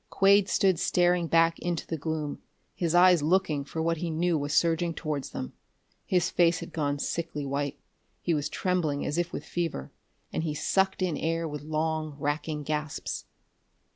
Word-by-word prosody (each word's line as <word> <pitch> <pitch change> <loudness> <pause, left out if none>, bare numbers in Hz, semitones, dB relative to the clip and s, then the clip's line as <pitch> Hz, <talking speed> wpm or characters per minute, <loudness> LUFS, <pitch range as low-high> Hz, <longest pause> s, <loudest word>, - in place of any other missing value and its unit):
Quade 200 0 +4
stood 190 -4 +3
staring 175 -1 +2
back 165 0 +3
into 175 -2 -2
the 165 - -3
gloom, 155 -1 -3 0.3
his 170 -1 -1
eyes 180 -2 +6
looking 155 -3 +2
for 160 +3 -4
what 165 0 +1
he 170 +2 -3
knew 170 +2 +1
was 145 -1 -2
surging 165 0 +2
towards 150 -3 -3
them. 65 - -6 0.5
His 180 -2 +2
face 170 -1 +4
had - - -8
gone 145 -3 0
sickly 150 -1 -3
white, 140 +1 -2 0.4
he 170 - 0
was 145 -2 -1
trembling 170 -6 0
as 150 - -1
if 175 0 -1
with - - -5
fever, 165 - -3 0.4
and - - 0
he 155 -2 -2
sucked 190 +4 +1
in 175 -4 0
air 165 +1 -1
with 150 -2 -5
long, 155 0 -2
racking 150 +1 -2
gasps. 150 0 -3
160 Hz, 170 wpm, -28 LUFS, 150-175 Hz, 0.5 s, eyes